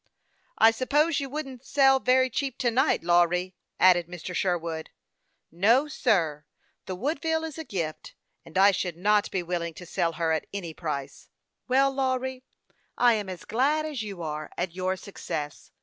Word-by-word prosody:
" - - -41
I 225 - +7
suppose 290 +7 +1
you 275 -1 -4
wouldn't 270 -3 -6
sell 270 -1 +4
very 260 0 +3
cheap 270 0 -2
to 250 -3 +1
night, 265 - +2
Lawry," 175 +1 +2 0.3
added 175 -2 +5
Mr. 180 0 -7
Sherwood. 170 -4 -2 0.4
" - - -49 0.2
No, 260 +6 +5
sir; 170 - 0 0.4
the 185 - -3
Woodville 320 - -1
is 320 0 -6
a - - -4
gift, 170 - -5 0.3
and 165 - -8
I 200 +1 +7
should 180 -3 -3
not 205 +3 +2
be 185 -2 -2
willing 170 -1 -3
to 180 - -10
sell 165 -1 -1
her 160 0 0
at 160 - -1
any 180 -5 -5
price." 145 -4 -5 0.2
" - - -56
Well, 270 +2 +3
Lawry, 260 -1 -2 0.5
I 245 -1 +5
am 210 -3 -2
as 185 -2 -8
glad 290 +6 +1
as 295 -6 -4
you 200 -5 -6
are 155 -1 -4
at 180 -2 -2
your 185 +1 -1
success. 150 -6 -6
200 Hz, 180 wpm, -27 LUFS, 175-265 Hz, 0.5 s, I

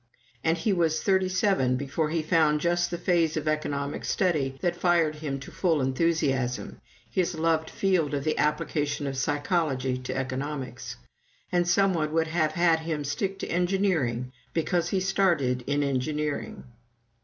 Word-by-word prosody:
And 165 +1 +2
he 200 +5 +1
was 165 -3 +1
thirty 190 -1 +2
seven 185 -9 +2
before 145 +3 -1
he 160 0 -1
found 155 -2 +3
just 175 +2 +1
the 175 - -3
phase 170 -3 +1
of 155 - -3
economic 145 -2 -2
study 145 -8 0
that 175 -2 0
fired 170 -3 +2
him 145 -3 -4
to - - -9
his - - -16
full 165 -5 +2
enthusiasm 135 -2 0 0.3
his 180 -2 -1
loved 160 0 +1
field 175 -7 +1
of 140 - -2
the 155 - 0
application 150 -1 0
of 135 -1 -3
psychology 140 -2 0
to 125 +1 -4
economics. 135 -1 -4 0.6
And 175 -1 +2
some 195 +2 +3
one 155 -3 -1
would 160 0 +1
have 155 -2 +1
had 170 -1 +3
him 160 -2 -3
stick 190 +7 -2
to - - -4
engineering 170 - 0 0.2
because 170 +1 0
he 195 - +1
started 170 -10 +1
in 145 +1 +1
engineering! 145 +2 -2
155 Hz, 160 wpm, -27 LUFS, 140-175 Hz, 0.6 s, found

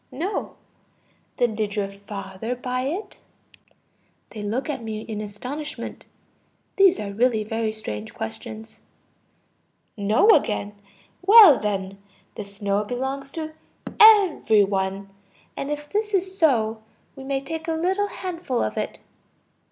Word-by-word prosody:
No. 335 +11 -3 0.8
Then 240 -2 +2
did 210 -1 -2
your 200 -2 -2
father 200 +3 -6
buy 250 +1 -3
it? 365 +9 -5 1.1
(They 215 - -7
look 220 +8 -2
at 295 -5 -3
me 215 -1 -4
in 215 -2 -5
astonishment; 250 +9 -7 0.7
these 385 -2 +5
are 200 -1 -5
really 225 0 +2
very 225 +1 -2
strange 110 - -6
questions.) 220 - -8 1.2
No, 215 - +3
again. 205 - +1 0.5
Well 395 - +9
then, 195 -2 -3 0.3
the 210 - -7
snow 200 0 -1
belongs 265 +4 -4
to 315 -1 -5 0.5
every 390 - +7
one. 195 0 -2 0.4
And 275 - -4
if 295 0 -4
this 420 +3 -1
is 380 0 -1
so, 225 - +2 0.3
we 270 - -9
may 270 0 -1
take 320 +4 -6
a 325 - 0
little 375 +5 0
handful 345 -10 -3
of 110 - -3
it. - - -4
235 Hz, 130 wpm, -24 LUFS, 205-315 Hz, 1.2 s, Well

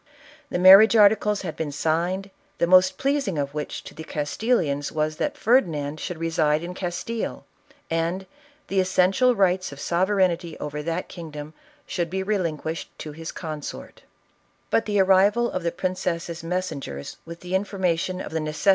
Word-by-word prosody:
The - - -1
marriage 195 +5 +8
articles 210 -1 +4
had 165 -4 -4
been 155 -2 -3
signed, 175 +6 -1 0.3
the - - +2
most 185 +1 +5
pleasing 275 - 0
of 140 -1 -2
which 150 -1 -5
to - - -11
the 160 - -8
Castilliiins 150 - -1
was 155 0 -1
that 295 - -2
Ferdinand 155 - +1
should 180 +1 -5
reside 160 -1 +1
in 175 +1 -5
Castile, 185 +6 -4 0.4
and 165 +3 -1 0.4
the 195 - 0
"essential 190 +7 +3
rights 185 -3 +2
of 140 - -10
sovereignty 180 -1 +1
over 150 0 -5
that 165 +2 -3
king 170 -3 -9
dom 150 +1 -8 0.3
should 175 -2 -2
be 190 +2 -2
relinquished 165 -5 -2
to 155 - -7
his 160 +2 -7
consort," 155 -4 -7 0.7
But 225 - +2
the 205 -1 +1
arrival 195 +5 +4
of 185 - -2
the 170 0 -1
princess' 175 -2 -3
messengers 165 - -4
with 170 0 -10
the 180 +1 -7
information 185 -2 0
of - - -7
the 160 - -1
neces.> 155 +2 -4
175 Hz, 160 wpm, -24 LUFS, 155-190 Hz, 0.7 s, marriage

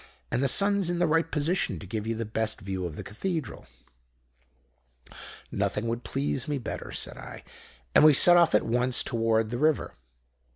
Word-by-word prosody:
And 125 - 0
the 135 - +2
sun's 200 +4 +3
in 175 - -1
the 175 - +2
right 165 +1 +1
position 150 - -1
to 90 - -10
give 105 +3 -5
you 115 - -2
the 115 +1 -4
best 110 0 -3
view 95 -2 -4
of 80 - -9
the - - -7
Cathedral.' 160 - -5 1.8
"'Nothing 105 - -2
would 115 +1 -3
please 135 -2 -2
me 145 -1 -2
better,' 125 - -7
said - - -4
I; - - -10 0.5
and - - +6
we 155 -1 +7
set 175 +6 +8
off 170 -8 +4
at 105 - +2
once 125 +1 +1
toward 115 -1 0
the 120 - -3
river. 155 0 0
125 Hz, 180 wpm, -27 LUFS, 110-160 Hz, 1.8 s, set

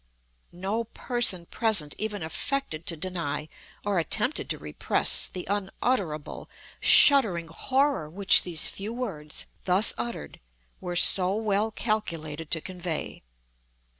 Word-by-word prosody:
No 200 +6 -3
person 230 -6 0
present 190 -9 0
even 210 -4 -4
affected 165 - -4
to 165 - -3
deny, 170 -4 -4 0.4
or 200 -3 0
attempted 220 - 0
to - - -2
repress, - - +3
the 180 - -8
unutterable, 195 - -3 0.3
shuddering 200 - +4
horror 265 - -1
which 195 +4 +4
these 170 -3 +2
few 210 +4 -5
words, 165 -12 -4 0.2
thus 190 +4 +5
uttered, 235 -1 -6 0.4
were 180 -1 -6
so 185 +2 +6
well 215 0 -1
calculated 165 -9 -4
to 160 - 0
convey. 175 -3 -6
190 Hz, 115 wpm, -26 LUFS, 165-220 Hz, 0.4 s, so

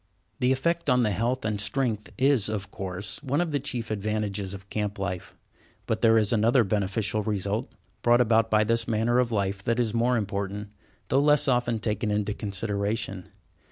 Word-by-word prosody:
The 125 -1 +3
effect 170 +4 0
on 125 -1 +4
the 105 - +1
health 115 +5 -1
and 105 -2 -1
strength 110 -3 -1
is, 130 -6 +4
of 100 -2 -4
course, 95 +1 -5
one 145 +1 -1
of 175 -2 0
the 145 - 0
chief 125 -5 -4
advantages 105 -2 -2
of 95 0 -12
camp 105 -1 -2
life. 95 -2 -4 0.5
But - - -1
there 115 0 +5
is 110 0 +2
another 115 +3 +4
beneficial 105 +1 0
result 105 +3 -2 0.3
brought 120 0 +4
about 115 -1 +3
by 110 0 +4
this 115 +1 0
manner 115 +2 +2
of 125 -2 +1
life 100 -2 -1
that 115 +3 0
is 115 -3 0
more 120 +1 +2
important, 100 -1 -3 0.4
though 135 +2 +3
less 150 0 +4
often 120 -3 +2
taken 105 0 -2
into 105 0 0
consideration. 100 -1 -3
110 Hz, 180 wpm, -26 LUFS, 100-120 Hz, 0.5 s, there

